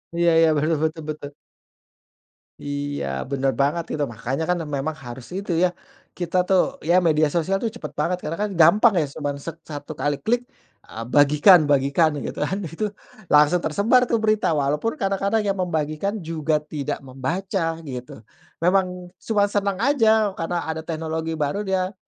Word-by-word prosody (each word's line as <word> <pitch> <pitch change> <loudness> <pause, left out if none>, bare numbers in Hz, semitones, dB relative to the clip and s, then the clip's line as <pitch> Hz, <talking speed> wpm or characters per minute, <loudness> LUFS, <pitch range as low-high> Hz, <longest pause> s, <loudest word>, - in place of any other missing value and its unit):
Iya 170 0 +3
iya, 165 - +6
betul 155 +2 +1
betul 160 0 -2
betul. 150 -2 -5 1.3
Iya, 145 - -4 0.2
bener 135 -1 +1
banget 155 +4 0
itu, 150 - -2
makanya 125 +7 -3
kan 180 - +2 0.2
memang 155 +3 -3
harus 120 0 -8
itu, 195 -3 -3
ya, 180 - +4 0.5
kita, 175 0 -2
tuh, 190 -2 +5 0.2
ya, 170 +4 +3
media 155 -2 +3
sosial, 175 +5 0
tuh, 230 - 0
cepat 155 - -9
banget 180 +5 -1
karena 200 +7 -2
gampang, 190 +5 +5
ya, 160 - +2
cuman 145 -1 -3
se 165 +4 -7
satu 155 0 -8
kali 145 -1 -1
klik, 240 +2 +2 0.5
eee, 115 - -6
bagikan 145 - +6
bagikan, 145 +3 +2
gitu, 140 - -5
kan, 165 +6 -1
itu 170 +7 -3 0.4
langsung 150 +4 +5
tersebar, 225 +10 +2
tuh, 230 - +3
berita. 215 -7 +1
Walaupun 150 +10 0
kadang-kadang 195 +2 0
yang 200 - +1
membagikan 160 +4 -2
juga 160 -4 -1
tidak 150 -2 -4
membaca, 165 +6 -2
gitu. 125 -4 -8 0.3
Memang 180 0 0
cuman 205 -2 +2
senang 200 -2 0
aja 220 -4 +3
karena 175 0 -3
ada 160 0 -3
teknologi 160 0 -3
baru, 150 +7 -1
dia 190 -1 -1
165 Hz, 160 wpm, -23 LUFS, 150-195 Hz, 1.3 s, iya